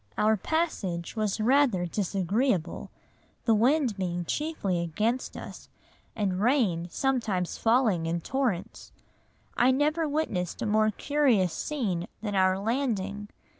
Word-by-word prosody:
Our 220 +1 +4
passage 200 - -2
was 215 -1 -1
rather 240 -5 +3
disagreeable, 195 - -1 0.6
the 230 - +4
wind 245 0 +2
being 175 -2 -2
chiefly 205 - -1
against 215 +10 -1
us, - - -9 0.5
and 195 -4 -1
rain 210 -9 +2
sometimes 220 -7 -1
falling 225 -8 +2
in 170 +1 -1
torrents. 230 -4 -2 0.6
I 245 - +4
never 300 +4 +1
witnessed 245 - -2
a - - -1
more 215 0 +3
curious 235 - +1
scene 200 - -2 0.2
than 205 -2 -2
our 185 -1 +3
landing. 210 -3 -2
215 Hz, 120 wpm, -28 LUFS, 185-260 Hz, 0.6 s, Our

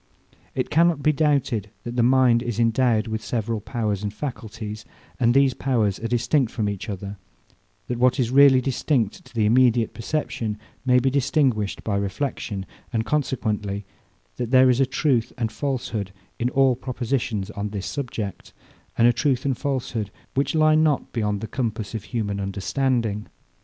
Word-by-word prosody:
It - - -2
cannot 165 -2 +3
be 155 - +5
doubted, 140 -8 +1
that 120 0 -5
the 120 - +2
mind 125 -1 +4
is 120 -2 -3
endowed 115 -1 +2
with 110 -1 -4
several 115 -2 -2
powers 105 -4 -2
and 105 -1 -2
faculties, 110 -3 -6 0.4
that 120 -2 +4
these 135 -1 +4
powers 115 -8 0
are 115 - -3
distinct 120 +2 +1
from 110 -2 -1
each 100 +2 -4
other, 100 0 -5 0.7
that 120 -1 -3
what 125 +1 +3
is 120 -2 +1
really 135 -1 +7
distinct 125 -4 0
to - - -19
the 110 -2 +2
immediate 120 0 +3
perception 115 -4 -3 0.3
may 125 0 +5
be 130 +1 +2
distinguished 130 -6 +1
by 100 -2 0
reflexion; 100 -1 -3 0.3
and 115 -2 -1
consequently, 105 -9 -1 0.5
that 120 -2 -3
there 130 0 +6
is 125 - +1
a 135 - +3
truth 130 -3 +1
and 115 -3 -1
falsehood 120 -8 -3 0.3
in 120 - +1
all 135 -1 +3
propositions 120 -5 -2
on 105 0 -4
this 100 -2 -5
subject, 115 -8 -5 0.4
and 115 - +6
a 120 - +5
truth 130 0 0
and 135 -3 0
falsehood, 125 -7 -2 0.2
which 140 +4 0
lie 155 0 +5
not 155 -2 +2
beyond 105 -3 -1
the 110 - -4
compass 110 -4 -3
of 110 -3 -5
human 105 -5 -2
understanding. 105 +2 -1
120 Hz, 165 wpm, -24 LUFS, 105-130 Hz, 0.7 s, really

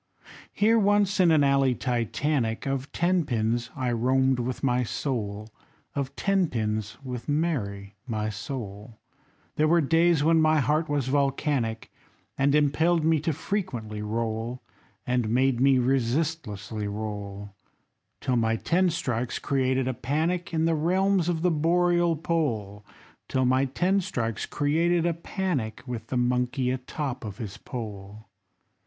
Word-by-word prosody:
Here, 225 +2 +3
once 205 -1 +2
in 180 -2 +6
an 155 -3 +5
alley 135 -2 +3
Titanic 120 0 -1
Of 135 0 -2
Ten 175 +1 +2
pins, 115 -3 -1
I 130 -3 -1
roamed 130 +2 +2
with 125 +2 -3
my 125 -2 +2
soul, 110 -3 -3 0.4
Of 140 -1 -3
Ten 195 -2 +2
pins, 110 -2 -2
with 125 0 -6
Mary, 110 -11 -1
my 110 -2 -2
soul; 105 -1 -7 0.6
They 155 - +3
were 170 +2 +4
days 165 +1 +3
when 165 +1 +4
my 155 0 +4
heart 150 +3 +1
was 145 -3 0
volcanic, 135 -4 0 0.4
And 140 +1 +2
impelled 155 +3 +2
me 160 -1 +3
to 155 +3 -1
frequently 130 - -3
roll, 115 +3 -3 0.4
And 125 -3 0
made 125 +1 +2
me 135 0 +5
resistlessly 125 -4 -1
roll, 100 -1 -5 0.7
Till 125 -1 0
my 115 -1 +2
ten 180 +10 +2
strikes 125 -7 -2
created 130 -2 0
a 130 - 0
panic 160 +9 -1
In 160 -1 +1
the 165 - +2
realms 180 +3 +2
of 165 -2 -1
the 180 - +3
Boreal 175 +2 +2
pole, 115 -12 -2 0.4
Till 130 -1 +1
my 130 +2 +3
ten 180 +9 +1
strikes 115 - -3
created 165 +4 +1
a 170 - +2
panic 165 - -3
With 115 -3 -6
the 130 - -2
monkey 125 +1 +1
atop 130 0 -4
of 105 -2 -6
his 105 -5 -6
pole. 105 -3 -7
130 Hz, 140 wpm, -26 LUFS, 115-160 Hz, 0.7 s, in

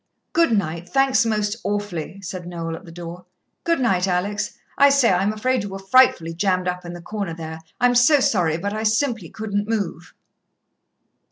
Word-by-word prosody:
"Good 335 -5 +3
night 170 -2 -3
thanks 270 -2 +3
most 210 0 0
awfully," 200 -3 -3
said 180 -1 -6
Noel 165 -2 -4
at - - -11
the 165 - -11
door. 175 +1 -9 0.4
"Good 335 -2 +1
night, 190 -7 +2
Alex. 190 +3 -1 0.2
I 280 0 +6
say, 275 -5 +4
I'm 190 +3 +2
afraid 255 +4 0
you 205 - -5
were 195 - -6
frightfully 195 -5 +3
jammed 185 +1 0
up 180 0 -2
in 175 - -6
the 175 -1 -9
corner 200 -3 -4
there 160 -1 -7 0.2
I'm 245 +1 +4
so 250 +5 +5
sorry, 175 -10 +2
but 200 +4 -3
I 215 - -3
simply 220 - 0
couldn't 205 -1 -3
move." 190 -6 -3
200 Hz, 180 wpm, -22 LUFS, 175-225 Hz, 0.4 s, I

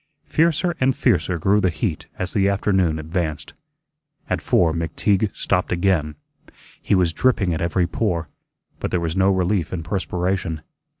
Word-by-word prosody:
Fiercer 170 +2 +1
and 130 0 +2
fiercer 90 -6 +1
grew 100 +6 +2
the 95 - +3
heat 85 -1 -3
as 95 -1 -3
the 100 -1 +3
afternoon 95 -5 +1
advanced. 80 -1 -3 0.8
At - - 0
four 80 -3 +2
McTeague 95 +5 0
stopped 90 -2 0
again. 85 -4 +1 0.7
He - - +1
was 90 -3 +2
dripping 105 -8 +2
at 80 - -3
every 85 +1 +1
pore, 85 -3 -1 0.5
but - - -2
there 90 - 0
was 85 -1 -2
no 95 0 +3
relief 95 -2 +1
in 85 -3 -4
perspiration. 90 -2 -2
90 Hz, 155 wpm, -22 LUFS, 85-100 Hz, 0.8 s, the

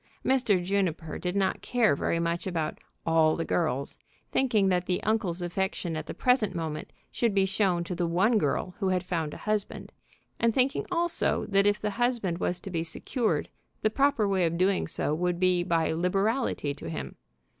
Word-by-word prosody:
Mr. 235 -9 +2
Juniper 180 -5 -1
did 180 +1 -3
not 195 -1 +1
care 235 - +2
very 165 - 0
much 170 +2 -1
about 165 -4 -2 0.3
"all 160 -1 +4
the 165 - -2
girls," 145 -5 -1 0.3
thinking 225 -7 +2
that 180 -1 +1
the 180 - -1
uncle's 190 -5 0
affection 175 -1 -2
at 155 - -5
the - - -4
present 240 -7 +2
moment 160 -2 -4 0.2
should 230 -4 0
be 195 -1 +4
shown 190 -3 +1
to 175 - -5
the 175 -1 -1
one 195 +7 +3
girl 180 +3 -1
who 195 - 0
had 185 -1 +1
found 165 -4 -2
a - - -7
husband, 210 -1 -2 0.5
and 230 -1 +2
thinking 265 +1 +1
also 345 -1 +1
that 200 0 +3
if 205 0 +2
the 210 - -2
husband 230 -8 0
was 180 0 -1
to 195 - -8
be 165 -2 -1
secured, 170 - -1 0.4
the 215 - +3
proper 275 -4 +2
way 190 -2 +2
of 165 +1 -2
doing 190 +2 +2
so 150 - -1
would 175 +2 0
be 185 -1 +3
by 165 -2 +1
liberality 195 - 0
to 85 - -8
him. 75 -4 -5
185 Hz, 185 wpm, -28 LUFS, 170-210 Hz, 0.5 s, all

